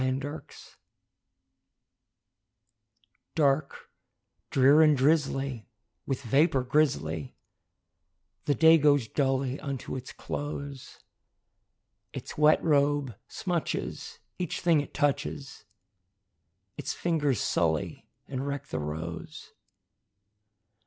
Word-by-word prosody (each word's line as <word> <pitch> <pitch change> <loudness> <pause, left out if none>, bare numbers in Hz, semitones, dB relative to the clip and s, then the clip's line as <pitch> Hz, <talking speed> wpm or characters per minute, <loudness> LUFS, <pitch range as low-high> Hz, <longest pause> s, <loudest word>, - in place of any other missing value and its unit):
A 130 0 +1
WET 130 - -2
DAY 145 +3 -5 2.9
Dark, 140 -2 0 0.6
drear, 140 +4 +5
and 150 -2 +5
drizzly, 135 - +1 0.4
with 135 0 -2
vapor 135 +2 +3
grizzly, 80 - 0 1.1
The 145 - +2
day 160 +3 +6
goes 145 -5 +3
dully 135 +1 0
unto 140 -3 -5
its 130 0 -7
close; 140 -2 -6 1.1
Its - - -7
wet 150 +1 +4
robe 145 - +2
smutches 175 -5 -3 0.2
each 180 -3 -3
thing 170 -4 +4
it 145 - -10
touches, 140 -2 -2 1.1
Its - - -3
fingers 150 - 0
sully - - -1 0.2
and 135 +1 -4
wreck 140 0 -4
the 80 - -3
rose. 80 +3 -6
140 Hz, 90 wpm, -28 LUFS, 130-150 Hz, 2.9 s, day